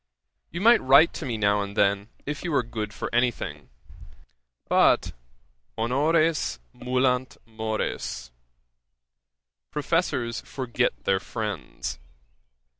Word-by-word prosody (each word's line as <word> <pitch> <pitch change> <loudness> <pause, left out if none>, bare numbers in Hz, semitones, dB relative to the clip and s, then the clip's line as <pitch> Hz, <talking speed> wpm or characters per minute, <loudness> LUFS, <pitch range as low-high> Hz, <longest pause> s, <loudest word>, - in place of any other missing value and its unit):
You 170 - -5
might 235 +3 +6
write 140 +5 +6
to 155 - -5
me 115 -3 -2
now 100 -1 +2
and 100 +1 -6
then, 100 +2 +2 0.2
if 145 +1 -4
you 175 - -2
were 140 - +2
good 110 -2 -5
for - - -6
any 120 +1 +4
thing. 75 - -8 1.0
But - - +4 0.7
honores 145 - +2 0.2
mulant 125 0 0
mores. 110 - -4 1.4
Professors 145 -6 -1
forget 125 -2 -2
their 95 -1 +2
friends. 100 - -5
120 Hz, 110 wpm, -26 LUFS, 105-140 Hz, 1.4 s, might